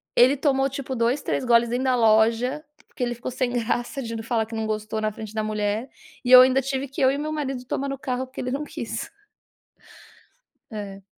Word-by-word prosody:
Ele 260 Hz, +3 st, +5 dB
tomou 270 Hz, -1 st, +2 dB
tipo 265 Hz, -1 st, -5 dB
2, 240 Hz, +4 st, +1 dB
3 -, -, -2 dB
goles 235 Hz, -1 st, +4 dB
dentro 250 Hz, +2 st, -1 dB
da 255 Hz, -1 st, +3 dB
loja 230 Hz, +5 st, +3 dB, 0.2 s
porque 255 Hz, -, -5 dB
ele 240 Hz, 0 st, -1 dB
ficou 240 Hz, -, -6 dB
sem 250 Hz, -1 st, -1 dB
graça 240 Hz, +2 st, -2 dB
de 230 Hz, -1 st, -5 dB
falar 225 Hz, -1 st, 0 dB
que 225 Hz, +1 st, -8 dB
não 220 Hz, 0 st, -2 dB
gostou 215 Hz, 0 st, -3 dB
na 215 Hz, 0 st, 0 dB
frente 215 Hz, 0 st, -9 dB
da 215 Hz, -1 st, -1 dB
mulher. 215 Hz, +3 st, -2 dB, 0.3 s
E 250 Hz, -, -1 dB
eu 255 Hz, -, +12 dB
ainda 260 Hz, +1 st, +4 dB
tive 270 Hz, +1 st, -3 dB
que 275 Hz, +1 st, -6 dB
eu 260 Hz, 0 st, +5 dB
e 280 Hz, -, -2 dB
o -, -, -4 dB
meu 305 Hz, +1 st, -3 dB
marido 270 Hz, -4 st, -3 dB
tomar 275 Hz, +3 st, -2 dB
no 275 Hz, -, -4 dB
carro 260 Hz, -1 st, -2 dB
porque 260 Hz, -, -11 dB
ele 250 Hz, 0 st, -3 dB
não 285 Hz, +3 st, -2 dB
quis. -, -, -6 dB, 1.6 s
É. 200 Hz, -2 st, -7 dB
250 Hz, 220 wpm, -24 LUFS, 220-270 Hz, 1.6 s, eu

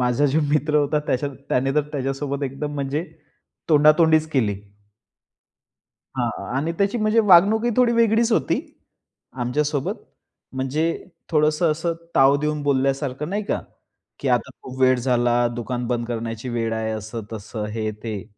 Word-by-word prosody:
माझा 125 Hz, +4 st, +2 dB
जो 150 Hz, +4 st, +2 dB
मित्र 150 Hz, 0 st, +2 dB
होता 150 Hz, +1 st, +2 dB
त्याच्या, 140 Hz, +3 st, 0 dB, 0.2 s
त्याने 135 Hz, +2 st, +1 dB
तर 150 Hz, -, +3 dB
त्याच्यासोबत 140 Hz, +1 st, -3 dB
एकदम 145 Hz, +2 st, -4 dB
म्हणजे, 140 Hz, +3 st, -2 dB, 0.6 s
तोंडातोंडीच 155 Hz, +1 st, +5 dB
केली. 110 Hz, -8 st, +1 dB, 1.6 s
हां, -, -, 0 dB, 0.3 s
आणि 155 Hz, +5 st, -1 dB
त्याची 200 Hz, +4 st, +1 dB
म्हणजे 215 Hz, +1 st, +3 dB
वागणूक 205 Hz, +3 st, +5 dB
ही 240 Hz, -, +2 dB
थोडी 245 Hz, -2 st, +4 dB
वेगळीच 230 Hz, 0 st, +3 dB
होती. -, -, +1 dB, 0.7 s
आमच्या 125 Hz, +4 st, -1 dB
सोबत. 145 Hz, -2 st, -2 dB, 0.6 s
म्हणजे, 135 Hz, +4 st, -2 dB, 0.5 s
थोडंसं 155 Hz, +1 st, +2 dB
असं, 165 Hz, +2 st, -2 dB, 0.2 s
ताव 135 Hz, +1 st, +5 dB
देऊन 150 Hz, -1 st, -1 dB
बोलल्यासारखं 135 Hz, +1 st, 0 dB
नाही 210 Hz, +2 st, -1 dB
का, -, -, -1 dB, 0.6 s
की -, -, -3 dB
आता -, -, +1 dB
खूप 130 Hz, 0 st, -9 dB
वेळ 130 Hz, 0 st, +5 dB
झाला, 120 Hz, -1 st, +2 dB
दुकान 120 Hz, +1 st, -3 dB
बंद 120 Hz, -1 st, -1 dB
करण्याची 115 Hz, +1 st, -4 dB
वेळ 115 Hz, -1 st, -1 dB
आहे 110 Hz, 0 st, -2 dB
असं-तसं, 110 Hz, 0 st, -6 dB
हे, 110 Hz, 0 st, -3 dB
ते. 105 Hz, -1 st, -6 dB
140 Hz, 145 wpm, -22 LUFS, 120-155 Hz, 1.6 s, तोंडातोंडीच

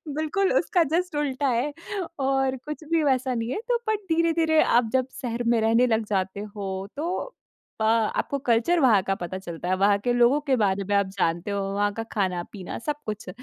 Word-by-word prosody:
बिल्कुल 345 Hz, +7 st, 0 dB
उसका 355 Hz, -4 st, +2 dB
जस्ट 360 Hz, -3 st, -1 dB
उल्टा 285 Hz, -1 st, 0 dB
है 260 Hz, +4 st, 0 dB, 0.5 s
और 270 Hz, -1 st, +1 dB
कुछ 300 Hz, +1 st, -6 dB
भी 330 Hz, -2 st, +3 dB
वैसा 260 Hz, -2 st, +1 dB
नहीं 230 Hz, 0 st, -2 dB
है -, -, -2 dB
तो 485 Hz, -, +3 dB
बट 435 Hz, -, +1 dB
धीरे-धीरे 325 Hz, -1 st, +3 dB
आप 235 Hz, -2 st, +3 dB
जब 260 Hz, 0 st, +2 dB
शहर 240 Hz, -1 st, -3 dB
में 235 Hz, -1 st, +3 dB
रहने 230 Hz, +3 st, +4 dB
लग 220 Hz, -1 st, +1 dB
जाते 190 Hz, -1 st, -1 dB, 0.2 s
हो 200 Hz, -2 st, -4 dB, 0.3 s
तो 360 Hz, +10 st, -3 dB, 0.5 s
अ, -, -, +2 dB
आपको 225 Hz, +5 st, +1 dB
कल्चर 240 Hz, +10 st, +3 dB
वहाँ 225 Hz, -8 st, +5 dB
का 195 Hz, -, +1 dB
पता 180 Hz, +1 st, -5 dB
चलता 175 Hz, -2 st, -7 dB
है। 185 Hz, -, +3 dB
वहाँ 200 Hz, +1 st, +4 dB
के 245 Hz, -, +1 dB
लोगों 245 Hz, +4 st, +4 dB
के 280 Hz, -3 st, +1 dB
बारे 200 Hz, -2 st, +1 dB
में 205 Hz, -, +1 dB
आप 200 Hz, -, +3 dB
जानते 170 Hz, +3 st, 0 dB
हो, 200 Hz, -, -1 dB
वहाँ 205 Hz, 0 st, +1 dB
का 225 Hz, -, -4 dB
खाना-पीना 185 Hz, -1 st, -3 dB
सब 295 Hz, +4 st, -2 dB
कुछ 210 Hz, -3 st, -5 dB
240 Hz, 200 wpm, -25 LUFS, 205-295 Hz, 0.5 s, वहाँ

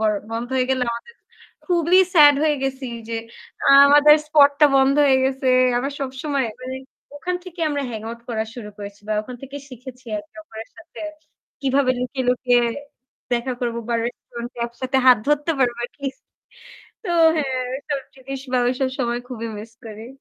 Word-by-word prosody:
তো -, -, 0 dB, 0.3 s
বন্ধ 230 Hz, +1 st, -3 dB
হয়ে 255 Hz, -1 st, +1 dB
গেলে 260 Hz, -1 st, +1 dB
আমাদের 235 Hz, -, -9 dB, 0.5 s
খুবলি 350 Hz, 0 st, +3 dB, 0.2 s
স্যাড 290 Hz, -2 st, +8 dB
হয়ে 300 Hz, -1 st, +2 dB
গেছি 265 Hz, 0 st, -3 dB, 0.2 s
যে 230 Hz, -, -3 dB, 0.5 s
আ -, -, +7 dB, 0.2 s
আমাদের 290 Hz, +1 st, +7 dB
স্পটটা 290 Hz, -1 st, +5 dB
বন্ধ 270 Hz, 0 st, +4 dB
হয়ে 265 Hz, -1 st, +4 dB
গেছে। 265 Hz, 0 st, -1 dB, 0.3 s
আমার 275 Hz, +3 st, -3 dB
সবসময় 270 Hz, 0 st, -2 dB, 0.2 s
মানে 260 Hz, +1 st, -5 dB, 0.4 s
ওখান 360 Hz, +5 st, -3 dB
থেকে 360 Hz, -2 st, -10 dB
আমরা 285 Hz, -1 st, -2 dB
hang 220 Hz, -2 st, -6 dB
out 235 Hz, -, -9 dB
করা 220 Hz, -2 st, -1 dB
শুরু 220 Hz, -4 st, -8 dB
করেছি 200 Hz, 0 st, -9 dB
বা -, -, 0 dB
ওখান 250 Hz, +3 st, -9 dB
থেকেই 275 Hz, +1 st, -8 dB
শিখেছি 255 Hz, 0 st, -11 dB
আর 205 Hz, -, -5 dB
একে -, -, -16 dB
অপরের 225 Hz, -7 st, -10 dB
সাথে 330 Hz, -, -13 dB, 0.6 s
কিভাবে 270 Hz, -1 st, +2 dB
লুকিয়ে, 255 Hz, +1 st, -3 dB
লুকিয়ে 245 Hz, -1 st, +3 dB, 0.7 s
দেখা 240 Hz, +2 st, -2 dB
করব 235 Hz, -1 st, -2 dB
বা 235 Hz, -, 0 dB
রেস্টুরেন্ট 240 Hz, 0 st, -7 dB
এ -, -, -5 dB
একসাথে 255 Hz, +3 st, -3 dB
হাত 250 Hz, -3 st, +8 dB
ধরতে 295 Hz, +2 st, +2 dB
পারবো 240 Hz, -2 st, 0 dB, 0.2 s
কিস 275 Hz, -2 st, -4 dB, 0.9 s
তো 355 Hz, -, -3 dB, 0.3 s
হ্যাঁ 265 Hz, -4 st, -1 dB, 0.2 s
এইসব 285 Hz, 0 st, -4 dB, 0.2 s
জিনিস 270 Hz, 0 st, -7 dB
বা 255 Hz, -, +3 dB
ওইসব 255 Hz, +2 st, 0 dB
সময় 240 Hz, -1 st, -1 dB
খুবই 230 Hz, -3 st, -5 dB
মিস 220 Hz, +2 st, -10 dB
করি। 220 Hz, +1 st, -9 dB
260 Hz, 170 wpm, -21 LUFS, 240-285 Hz, 0.9 s, স্যাড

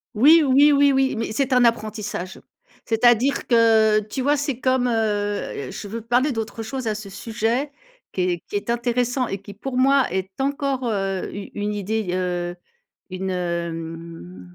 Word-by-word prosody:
Oui, 305 Hz, +9 st, +7 dB
oui, 285 Hz, +2 st, +5 dB
oui, 285 Hz, 0 st, +5 dB
oui, 265 Hz, -1 st, +2 dB
mais 225 Hz, -1 st, -3 dB
c'est 265 Hz, +4 st, 0 dB
un 250 Hz, -1 st, +5 dB
apprentissage. 215 Hz, -5 st, -2 dB, 0.4 s
C'est-à-dire 240 Hz, +3 st, +2 dB
que, 220 Hz, -2 st, +5 dB
tu 215 Hz, +5 st, -5 dB
vois, 285 Hz, +3 st, +3 dB
c'est 280 Hz, -3 st, -2 dB
comme, 255 Hz, -1 st, +1 dB
heu 205 Hz, -, -2 dB
je -, -, -7 dB
veux 225 Hz, +3 st, -5 dB
parler 245 Hz, +6 st, +1 dB
d'autre 225 Hz, 0 st, -4 dB
chose 255 Hz, +2 st, -5 dB
à 215 Hz, -, 0 dB
ce 210 Hz, -1 st, -8 dB
sujet 230 Hz, +7 st, -2 dB, 0.4 s
qui 185 Hz, -, -2 dB
est 175 Hz, -2 st, -1 dB
qui -, -, -1 dB
est 205 Hz, -, -6 dB
intéressant 245 Hz, +1 st, 0 dB
et 195 Hz, -, -3 dB
qui, 200 Hz, +1 st, -12 dB
pour 250 Hz, +5 st, -5 dB
moi, 270 Hz, +1 st, +3 dB
est 190 Hz, 0 st, -2 dB
encore, 275 Hz, -1 st, -1 dB
heu, 195 Hz, -3 st, -2 dB
u 200 Hz, 0 st, -7 dB
une 210 Hz, 0 st, -2 dB
idée, 210 Hz, +1 st, -2 dB
heu, 175 Hz, -1 st, -2 dB, 0.5 s
une, 190 Hz, +1 st, -4 dB
hem, 165 Hz, -, -5 dB
220 Hz, 170 wpm, -22 LUFS, 195-255 Hz, 0.5 s, Oui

